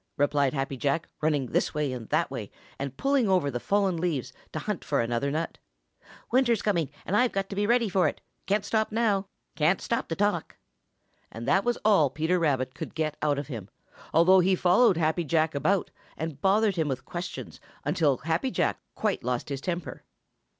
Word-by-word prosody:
replied 145 -1 +2
Happy 135 -1 -3
Jack, 145 +5 0
running 150 -3 +1
this 125 - -1
way 150 -3 0
and 120 -3 -7
that - - +1
way, - - -5 0.3
and 135 -1 -4
pulling 275 -6 +2
over 180 -7 +2
the 120 - -3
fallen 195 +2 +1
leaves 160 -6 -2 0.2
to - - -5
hunt - - -3
for - - 0
another 120 +4 0
nut. 160 +3 -3 0.7
"Winter's 240 -3 +3
coming, 170 -8 +1 0.2
and 195 - -1
I've 245 +3 +3
got 195 0 -3
to - - -4
be 205 +1 +1
ready 235 0 +3
for 185 -2 +2
it. - - -3 0.3
Can't 205 +1 +1
stop 220 +1 +1
to 195 -4 -1
talk." 205 -5 0 0.8
And 115 +2 -7
that 195 - +3
was 240 +2 0
all 195 -10 +5
Peter 160 +6 0
Rabbit 130 -5 0
could - - -7
get 155 -1 -1
out 145 -2 +1
of 140 - -3
him, 115 -8 -7 0.4
although 185 +3 +6
he 185 +1 +3
followed 185 +2 +4
Happy 160 +1 +1
Jack 160 0 +1
about 185 +7 +1 0.3
and 160 -3 -5
bothered 200 0 +3
him 160 -2 +1
with 135 -3 -3
questions 175 +1 -6 0.3
until 145 -6 +2
Happy 165 +10 -1
Jack - - 0 0.2
quite 210 -3 -1
lost 125 +3 -2
his 140 -1 -4
temper. 175 +1 -4
165 Hz, 185 wpm, -27 LUFS, 145-200 Hz, 0.8 s, although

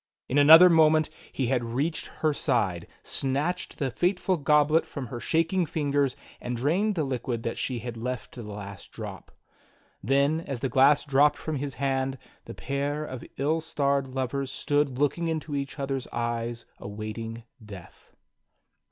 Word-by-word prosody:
In 140 - +2
another 160 +5 +10
moment 155 -2 +4 0.2
he 135 - -1
had 125 0 +1
reached 135 +8 -2
her 155 -1 -1
side, 105 - 0 0.2
snatched 145 +7 -2
the 135 -4 -1
fateful 180 +5 +1
goblet 150 +1 +3
from 140 -3 -6
her 120 - -4
shak 165 +6 0
ing 185 -3 +2
fingers, 145 -3 0 0.3
and 125 0 -3
drained 180 - +1
the 160 - 0
liquid 125 -3 -3
that 115 - -3
she 130 - -2
had 120 -2 -6
left 125 +1 -4
to 125 - -9
the 105 -2 -8
last 100 -2 -9
drop. - - -8 0.7
Then 140 +7 +2
as 135 -7 -5
the 135 - 0
glass 140 +3 +4
dropped 145 +1 +4
from 155 -2 -3
his 140 0 -4
hand, 135 -1 -1 0.3
the - - -8
pair 145 +2 -2
of 130 -4 -7
ill 155 +4 +1
starred 140 -4 0
lovers 130 +1 -3
stood 145 -3 0
looking 145 +4 +1
into 160 -2 -3
each 140 +1 -4
other's 135 -2 -3
eyes 120 0 -3
awaiting 110 +2 -6 0.2
death. 100 -5 -12
140 Hz, 160 wpm, -27 LUFS, 120-150 Hz, 0.7 s, another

